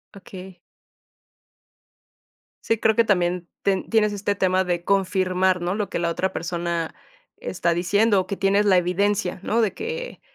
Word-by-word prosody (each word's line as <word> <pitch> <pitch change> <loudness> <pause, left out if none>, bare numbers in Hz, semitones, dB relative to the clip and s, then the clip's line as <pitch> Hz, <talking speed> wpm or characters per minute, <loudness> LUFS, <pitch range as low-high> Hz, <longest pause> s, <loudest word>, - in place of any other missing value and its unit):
Okey. 190 -1 -11 2.1
Sí, 225 - +1
creo 220 -1 +3
que 230 - +4
también 180 -4 0
ten 195 -1 -1
tienes 210 -2 +2
este 205 0 -1
tema 185 -1 +2
de 175 -1 -2
confirmar, 185 -1 +1
¿no?, 180 +3 -1
lo 205 -2 -2
que - - -3
la 170 -1 0
otra 190 +3 -2
persona 170 -1 -3 0.4
está 170 -2 -1
diciendo. 200 +4 +2
O 185 - -9
que 200 - -3
tienes 200 +1 +2
la 190 -2 +5
evidencia, 180 +1 0
¿no? 230 +2 +1
De 215 - +1
que 475 +3 -6
190 Hz, 155 wpm, -23 LUFS, 180-205 Hz, 2.1 s, la